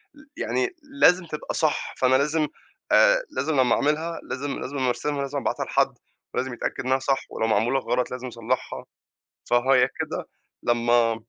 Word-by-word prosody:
ل 300 - -17
يعني 385 -1 -1
لازم 270 -11 +4
تبقى 155 -2 -5
صح، 155 -2 0
فأنا 130 0 +4
لازم 150 +3 +2 0.4
آآ - - +5
لازم 155 +2 -1
لمّا 125 -2 +4
أعملها 160 +3 0
لازم 140 +2 -4
لازم 140 +2 -5
لمّا 130 -1 +1
أرسمها، 140 +4 -2
لازم 140 +1 -3
أبعتها - - -2
لحد، - - +1 0.4
لازم 130 -1 -1
يتأكد 120 - -4
إنّها 130 +1 +2
صح، 135 0 0
ولو 110 - -1
معمولة 115 +5 +2
غلط 125 -1 -1
لازم 125 0 -5
أصلحها، 115 -2 -3 0.7
فهي 125 +1 +4
كده - - -4 0.4
لمّا 120 -1 +3
135 Hz, 160 wpm, -25 LUFS, 125-150 Hz, 0.7 s, آآ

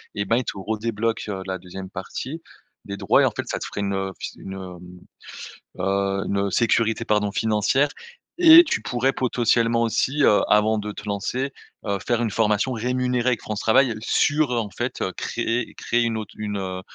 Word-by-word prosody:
et 100 - -1
ben 115 +4 +2
ils 125 - -1
te - - -3
redébloquent, 110 +2 -2
heu, 95 -1 -5
la 95 0 -2
2e 95 +1 -9
partie 145 - -6 0.4
des 100 - -5
droits 100 -2 +3
et - - +5
en - - +2
fait - - -5
ça - - -2
te - - -5
ferait - - -5
une, 100 0 -1
heu, 95 0 -2
f - - -25
s - - -5
une 95 - -8
hem, 95 -2 -8 1.0
heu, 100 0 0
une 100 0 0
sécurité 115 0 +1
pardon, 105 -1 +1
financière 110 +7 +2 0.5
et 340 -1 +9
tu - - -1
pourrais 125 +2 0
potentiellement 115 -2 +1
aussi, 130 +6 +1
heu, 105 - +5
avant 105 +1 +4
de 105 0 -4
te 105 - -10
lancer, 125 +7 -2 0.3
heu, 100 -1 -1
faire 120 -1 +1
une 115 - 0
formation 110 +4 +1
rémunérée 125 +1 0
avec 115 -4 -1
France 110 -1 -4
Travail, 115 +1 +3
sur, 145 +4 +2
heu, - - 0
en 105 -3 -3
fait 120 +4 -4 0.2
créer 120 0 -2
créer 120 0 0
une 115 -1 -1
au 110 - -4
une, 105 -1 -3
heu, 95 -1 -4
110 Hz, 200 wpm, -23 LUFS, 100-120 Hz, 1.0 s, et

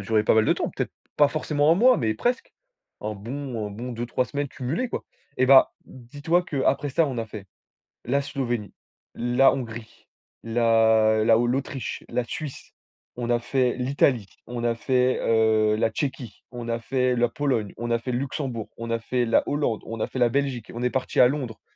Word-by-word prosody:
duré 105 +2 +1
pas - - +3
mal 110 0 +4
de - - +4
temps, - - -2
peut-être, - - -4 0.2
pas 145 - +6
forcément 150 0 +2
1 - - +4
mois 250 +7 +5
mais 110 -2 0
presque, 245 - -1 0.5
un 105 - -4
bon 120 +1 -5
un 105 - -7
bon 120 +5 -6
2-3 120 +2 -1
semaines 145 0 -3
cumulées 145 - -3
quoi - - -4 0.4
et 130 - +4
ben, 135 0 +8 0.2
dis-toi 145 +8 -2
qu'après 145 -2 0
ça 165 - +3
on 130 -3 -4
a 115 - -3
fait- 105 -2 -9 0.6
la 140 +3 +1
Slovénie, 120 -7 -3 0.4
la 120 +3 +3
Hongrie, 115 -3 -7 0.4
la 110 -1 +3
la 115 0 +5
o 120 - +2
l'Autriche, 135 +1 -3
la 125 - -1
Suisse, 140 +4 -7 0.5
on 120 -1 -3
a 120 0 +3
fait, 125 +1 0
l'Italie, 125 -4 +1 0.2
on 120 -1 -4
a 115 - +1
fait, 125 +1 +1
heu, 110 -1 +3
la 115 0 +2
Tchéquie, 130 -2 -5
on 120 -2 -7
a 115 0 -1
fait 125 +1 0
la 120 0 +2
Pologne, 120 -7 -1
on 120 +1 -4
a 115 - +2
fait 120 +2 -5
le 120 - 0
Luxembourg, 130 -4 -4
on 115 0 -5
a 115 - 0
fait 120 +2 -1
la 115 - +3
Hollande, 145 -7 -1
on 115 -1 -6
a - - 0
fait 130 - -6
la 120 - +5
Belgique 130 -2 -2
et - - -10
on 120 - -4
est 125 - +2
parti 130 0 +1
à 125 - +7
Londres. 130 -6 -4
120 Hz, 205 wpm, -25 LUFS, 115-135 Hz, 0.6 s, ben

